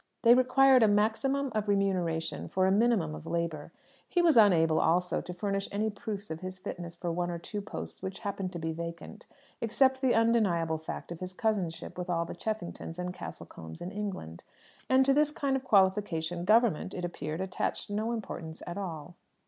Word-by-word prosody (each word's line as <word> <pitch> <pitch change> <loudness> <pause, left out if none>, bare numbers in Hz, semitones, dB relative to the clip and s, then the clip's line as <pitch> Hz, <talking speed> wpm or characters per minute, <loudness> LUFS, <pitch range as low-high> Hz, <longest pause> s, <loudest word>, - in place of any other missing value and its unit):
They 235 0 +8
required 255 +1 +5
a 220 - +6
maximum 225 +7 +1
of 215 -1 -1
remuneration 180 -5 0
for 185 0 +1
a 190 - +3
minimum 205 -7 +2
of 155 - -9
labour. 170 -2 -2 0.4
He 355 - +1
was 340 -3 +5
unable, 165 -8 +5
also, 180 +2 +2
to 180 - -7
furnish 195 +2 -2
any 215 +2 0
proofs 205 -2 -6
of 160 - -4
his 185 +1 -6
fitness 175 -2 -6
for 170 0 -3
one 175 +1 -1
or 170 - -3
two 205 +5 -5
posts 200 - -7
which 190 0 -6
happened 195 -3 -3
to - - -4
be 160 -1 -2
vacant, 170 +6 -7 0.3
except 260 +3 +3
the 260 -4 +3
undeniable 195 -9 +2
fact 160 - -7
of 170 - -6
his 185 0 -6
cousinship 185 -6 -2
with 180 - -4
all 170 -1 +1
the - - -6
Cheffingtons 200 -6 -5
and 180 0 -3
Castlecombes 80 - -9
in 175 - -6
England; 195 - -5 0.5
and 260 0 +5
to 275 - +4
this 295 +1 +4
kind 280 -2 -1
of 265 - -2
qualification 190 -6 +2
"Government," 215 -4 +3
it 180 - -3
appeared, 160 -2 -4
attached 190 +2 -3
no 215 +3 -1
importance 170 -8 -6
at 175 +3 -5
all. 170 -4 -6
190 Hz, 190 wpm, -30 LUFS, 170-220 Hz, 0.5 s, They